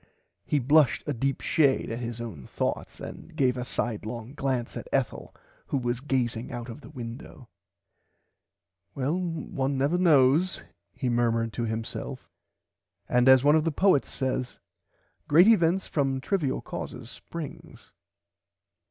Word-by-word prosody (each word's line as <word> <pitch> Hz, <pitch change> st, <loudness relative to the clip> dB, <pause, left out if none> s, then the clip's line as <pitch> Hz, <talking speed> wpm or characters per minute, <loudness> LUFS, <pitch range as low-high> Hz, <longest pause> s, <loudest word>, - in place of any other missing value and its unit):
He 150 Hz, -, +2 dB
blushed 145 Hz, +2 st, +4 dB
a 150 Hz, -, -1 dB
deep 135 Hz, +2 st, -1 dB
shade 140 Hz, -7 st, +2 dB
at 115 Hz, -, -3 dB
his 120 Hz, -1 st, -5 dB
own 95 Hz, -, -7 dB
thourghts -, -, -3 dB
and 170 Hz, -, -9 dB
gave 130 Hz, -4 st, +2 dB
a 125 Hz, -, -3 dB
side 120 Hz, -3 st, -2 dB
long 115 Hz, +3 st, -6 dB
glance 130 Hz, -4 st, -2 dB
at -, -, -6 dB
Ethel -, -, -1 dB, 0.4 s
who -, -, 0 dB
was 120 Hz, -2 st, -1 dB
gazing 125 Hz, -4 st, -1 dB
out 120 Hz, -1 st, -6 dB
of 115 Hz, -, -8 dB
the 120 Hz, -, -12 dB
window. 120 Hz, -2 st, -9 dB, 1.5 s
Well 140 Hz, +4 st, 0 dB
one 145 Hz, -6 st, -2 dB
never 145 Hz, +7 st, +1 dB
knows 160 Hz, +1 st, +4 dB, 0.3 s
he 130 Hz, -, -4 dB
murmerd 115 Hz, -1 st, +1 dB
to 115 Hz, +3 st, -3 dB
himself 110 Hz, 0 st, -5 dB, 0.8 s
and 125 Hz, +1 st, +4 dB
as 130 Hz, -1 st, +7 dB
one 145 Hz, +1 st, +6 dB
of 160 Hz, -, +3 dB
the 165 Hz, -, 0 dB
poets 185 Hz, -2 st, +3 dB
says 130 Hz, -1 st, -2 dB, 0.7 s
great 170 Hz, +7 st, +6 dB
events 190 Hz, -4 st, +4 dB
from 135 Hz, -3 st, 0 dB
trivil 145 Hz, -2 st, -1 dB
causes -, -, -7 dB
springs. 165 Hz, -4 st, -9 dB
130 Hz, 145 wpm, -27 LUFS, 120-150 Hz, 1.5 s, as